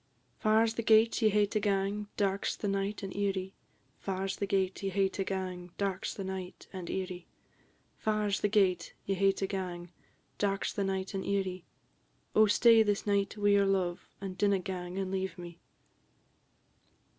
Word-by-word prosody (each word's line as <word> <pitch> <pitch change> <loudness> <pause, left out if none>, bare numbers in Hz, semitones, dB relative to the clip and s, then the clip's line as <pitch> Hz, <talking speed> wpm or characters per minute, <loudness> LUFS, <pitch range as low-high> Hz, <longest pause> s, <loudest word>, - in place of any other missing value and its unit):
"Far 220 +1 +4
's 225 - -1
the 230 - -2
gate 225 +1 +4
ye 220 - +5
hae 210 0 +3
to 210 +1 -1
gang; 200 0 0
dark 200 -1 0
's - - -1
the 205 - -4
night, 195 +1 -1
and 190 -1 -5
eerie; 195 -1 -1 0.5
Far 195 0 -2
's 195 - -2
the 200 - -2
gate 190 -1 0
ye 195 - -1
hae 195 0 +2
to 195 - -3
gang; 185 -2 -4
dark 195 -2 -1
's - - -4
the 195 - -5
night, 190 -1 -6
and 185 -3 -6
eerie; 185 -2 -4 0.7
Far 215 -1 0
's 195 - +1
the - - +2
gate 190 -5 +2
ye 195 - 0
hae 195 +1 +4
to 195 - -2
gang; 180 -3 -4 0.5
dark 195 -1 0
's - - -2
the 200 - -1
night, 190 0 -2
and 195 - -2
eerie; 190 -3 -2 0.7
Oh, 215 0 +7
stay 230 +2 +6
this 205 -2 +1
night 200 0 +1
wi' 205 0 +2
your 200 -1 +4
love, 185 -3 -1
and 195 -2 -5
dinna 200 -1 +3
gang 180 -1 -5
and 190 -1 -2
leave 190 0 -2
me." 175 -1 -9
195 Hz, 190 wpm, -31 LUFS, 190-205 Hz, 0.7 s, Oh